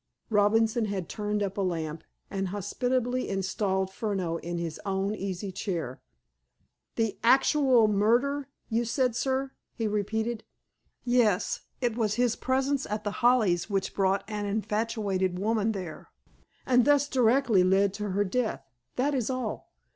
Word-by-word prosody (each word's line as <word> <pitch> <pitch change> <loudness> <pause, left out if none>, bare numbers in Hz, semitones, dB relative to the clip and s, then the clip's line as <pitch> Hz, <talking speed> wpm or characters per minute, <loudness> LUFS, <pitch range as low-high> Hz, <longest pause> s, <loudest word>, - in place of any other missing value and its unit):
Robinson 220 +2 +3
had 195 -4 -3
turned 210 0 -2
up 195 0 -4
a - - +1
lamp, 165 -4 -2 0.3
and 195 -1 -1
hospitably 245 +6 -1
installed 190 0 -1
Furneaux 190 -7 -2
in 175 +1 -5
his 165 -2 -4
own 195 0 -1
easy 195 -1 -4
chair. 170 -9 -4 0.9
"The 225 -3 -1
'actual 260 -1 +5
murder,' 240 +7 +2 0.2
you 230 +1 0
said, 245 0 0
sir?" 265 +1 -1 0.2
he 225 -3 -1
repeated. 220 +2 -1 0.6
"Yes. 240 -6 +2 0.2
It 240 -3 0
was 215 -3 0
his 245 -1 +2
presence 265 +1 0
at 210 0 -3
The 205 - -4
Hollies 220 -8 +3
which 195 -2 -1
brought 195 0 +1
an 210 -1 -3
infatuated 205 -3 -1
woman 220 +2 +1
there, 185 -6 -7 0.6
and 250 -1 +4
thus 285 +1 +4
directly 245 -5 +3
led 195 +1 +3
to 210 0 -4
her 200 +2 +1
death. 225 +3 -2 0.3
That 280 +4 +1
is 255 -4 0
all. 255 -4 -4
210 Hz, 140 wpm, -28 LUFS, 195-245 Hz, 0.9 s, actual